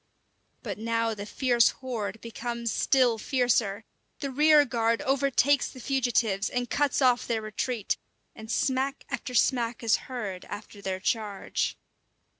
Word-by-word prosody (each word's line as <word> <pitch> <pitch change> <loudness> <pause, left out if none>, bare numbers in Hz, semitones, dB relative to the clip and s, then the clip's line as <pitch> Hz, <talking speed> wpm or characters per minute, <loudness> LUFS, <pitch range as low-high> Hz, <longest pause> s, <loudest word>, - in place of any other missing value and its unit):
But - - -5
now 230 0 0
the 205 -1 -7
fierce 240 0 +3
horde 225 -6 -5
becomes 235 0 -4
still 250 -4 +3
fiercer. 230 -5 +1 0.3
The 275 -2 -3
rear 300 +2 +6
guard 230 -2 0
overtakes 275 0 +2
the 255 - -12
fugitives 235 -6 +1
and 245 0 -2
cuts 285 -1 +1
off 250 -1 +3
their 225 -2 -1
retreat; 215 +1 -2 0.4
and 220 0 -10
smack 265 +3 0
after 250 - -4
smack 240 -2 +1
is 225 - +4
heard 205 -8 -5
after 205 0 -9
their 190 -1 -3
charge. 210 -1 -2
235 Hz, 135 wpm, -27 LUFS, 220-260 Hz, 0.4 s, rear